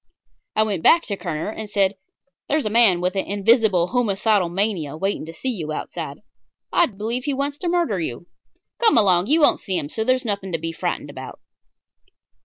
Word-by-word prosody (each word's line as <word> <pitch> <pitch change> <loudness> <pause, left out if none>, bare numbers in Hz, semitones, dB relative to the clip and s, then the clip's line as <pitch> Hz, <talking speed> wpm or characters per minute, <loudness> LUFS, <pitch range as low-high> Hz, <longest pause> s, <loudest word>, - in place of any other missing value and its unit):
I 215 - +4
went 200 -6 -2
back 335 - +5
to 200 - -4
Kerner 175 0 -4
and 220 -1 -7
said: 200 -2 +2 0.6
"There's 300 -2 +1
a 215 - -1
man 215 -6 +5
with 180 +2 -1
an 195 - -1
invisible 200 -3 +3
homicidal 210 -5 +1
mania 175 -6 -2
waiting 195 -2 -2
to - - -6
see 260 +9 -3
you 165 -9 -4
outside. 155 -1 -6 0.5
I 345 - +4
believe 230 +4 -4
he 285 -2 -1
wants 280 +1 -3
to 355 - -2
murder 340 - +1
you. 160 -1 -5 0.5
Come 455 - +4
along. 185 -3 +4
You 315 +5 +3
won't 290 - +4
see 190 -2 -2
him, 145 -3 -4
so 220 - -2
there's 255 +2 +1
nothing 200 -3 -3
to - - +1
be 165 +1 -4
frightened 165 - -4
about." - - -9
205 Hz, 195 wpm, -22 LUFS, 175-240 Hz, 0.6 s, back